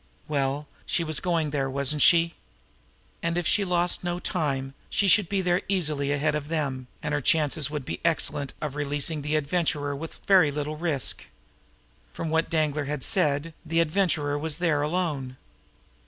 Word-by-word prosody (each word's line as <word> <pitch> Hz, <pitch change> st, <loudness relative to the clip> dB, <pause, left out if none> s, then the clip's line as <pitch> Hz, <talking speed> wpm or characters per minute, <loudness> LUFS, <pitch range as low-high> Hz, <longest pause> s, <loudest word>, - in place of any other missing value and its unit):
Well, 140 Hz, 0 st, -1 dB, 0.2 s
she 170 Hz, -, +1 dB
was 155 Hz, -2 st, +1 dB
going 165 Hz, -5 st, 0 dB
there, 135 Hz, -2 st, -1 dB
wasn't 140 Hz, +2 st, 0 dB
she? 170 Hz, +2 st, +5 dB, 0.9 s
And 170 Hz, +1 st, -1 dB
if 175 Hz, -, -1 dB
she 205 Hz, -, +3 dB
lost 180 Hz, -1 st, +1 dB
no 175 Hz, 0 st, -2 dB
time 135 Hz, -7 st, -2 dB, 0.2 s
she 200 Hz, -, +1 dB
should 190 Hz, -1 st, +5 dB
be 195 Hz, -1 st, +1 dB
there 180 Hz, 0 st, +1 dB
easily 150 Hz, -7 st, 0 dB
ahead 145 Hz, +1 st, +1 dB
of 150 Hz, -1 st, -3 dB
them, 140 Hz, -5 st, -2 dB, 0.2 s
and 150 Hz, -1 st, -2 dB
her 145 Hz, -, 0 dB
chances 150 Hz, 0 st, +2 dB
would 150 Hz, -3 st, -4 dB
be -, -, -5 dB
excellent 145 Hz, -4 st, 0 dB
of 150 Hz, -3 st, -3 dB
releasing 145 Hz, +1 st, -1 dB
the 150 Hz, +2 st, -1 dB
Adventurer 150 Hz, -2 st, 0 dB
with 160 Hz, +3 st, -8 dB
very 185 Hz, -6 st, +6 dB
little 150 Hz, +1 st, -3 dB
risk. 155 Hz, -6 st, -1 dB, 0.9 s
From 160 Hz, -, -4 dB
what 160 Hz, +1 st, +1 dB
Danglar 155 Hz, -2 st, 0 dB
had 145 Hz, -1 st, -3 dB
said, 160 Hz, -5 st, +1 dB
the 165 Hz, +1 st, 0 dB
Adventurer 155 Hz, -4 st, +1 dB
was 155 Hz, 0 st, -1 dB
there 165 Hz, -4 st, +1 dB
alone. 150 Hz, -5 st, -2 dB
150 Hz, 170 wpm, -26 LUFS, 145-170 Hz, 0.9 s, very